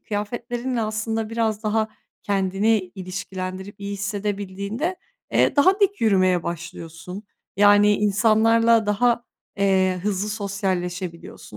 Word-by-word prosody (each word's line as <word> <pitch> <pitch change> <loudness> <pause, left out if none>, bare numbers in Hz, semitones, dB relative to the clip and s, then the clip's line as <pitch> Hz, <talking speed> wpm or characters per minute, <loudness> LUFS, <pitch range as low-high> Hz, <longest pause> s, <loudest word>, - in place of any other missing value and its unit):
kıyafetlerinle 240 +4 -3
aslında 220 +1 -2
biraz 225 -1 -1
daha 220 0 0 0.3
kendini 200 +2 +1 0.2
ilişkilendirip 185 +1 -6
iyi 200 0 -4
hissedebildiğinde, 200 - -3 0.4
eee, - - +3
daha 375 +8 +4
dik 400 0 +2
yürümeye 185 -5 +3
başlıyorsun. 170 +2 -7 0.3
Yani 205 +1 +6
insanlarla 225 +2 +3
daha, 235 +3 +2 0.3
eee, 190 -2 +2
hızlı 205 0 -1
sosyalleşebiliyorsun. 185 - -4
205 Hz, 100 wpm, -23 LUFS, 190-225 Hz, 0.4 s, Yani